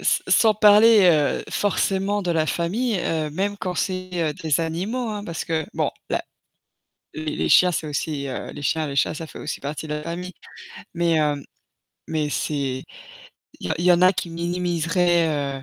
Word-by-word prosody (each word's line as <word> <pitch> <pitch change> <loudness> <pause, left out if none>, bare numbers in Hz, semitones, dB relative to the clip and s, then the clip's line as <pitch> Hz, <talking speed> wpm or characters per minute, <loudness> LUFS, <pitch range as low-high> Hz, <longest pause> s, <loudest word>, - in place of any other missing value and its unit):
s - - +1
sans 220 -1 +5
parler, 210 +1 +7
heu, 150 -3 +1
forcément 200 0 0
de 180 - -1
la 160 -2 +2
famille, 190 - -1
heu, 155 -2 -1
même 200 +5 -2
quand 185 -2 -4
c'est, 185 0 -2 0.2
heu, - - -6
des 155 0 0
animaux, 195 +10 -2
hein, 210 -1 -5
parce 170 -4 -5
que 160 -1 -1
bon, - - 0 0.2
là - - 0 0.9
les 155 -1 -4
les - - -1
chiens, 180 - +6
c'est 155 - -2
aussi, 145 -1 -3
heu 130 - -5
les 145 - -9
chiens, 155 +1 0
les 140 - -5
chats, - - +2
ça 160 +1 -6
fait - - -11
aussi 150 - -5
partie 150 +2 -5
de 150 - -2
la 150 - -4
famille. 175 +3 -5 0.6
Mais, 170 -1 +1
hem, 150 -3 +1 0.6
mais 155 -2 -1
c'est 135 -3 -2 0.8
il - - -5
y - - -5
en - - +1
il 170 - -2
y 180 - +7
en 175 0 +3
a 185 +1 +6
qui 175 -2 -4
minimiseraient, 170 0 +1 0.3
heu, - - -14
170 Hz, 195 wpm, -23 LUFS, 155-185 Hz, 0.9 s, parler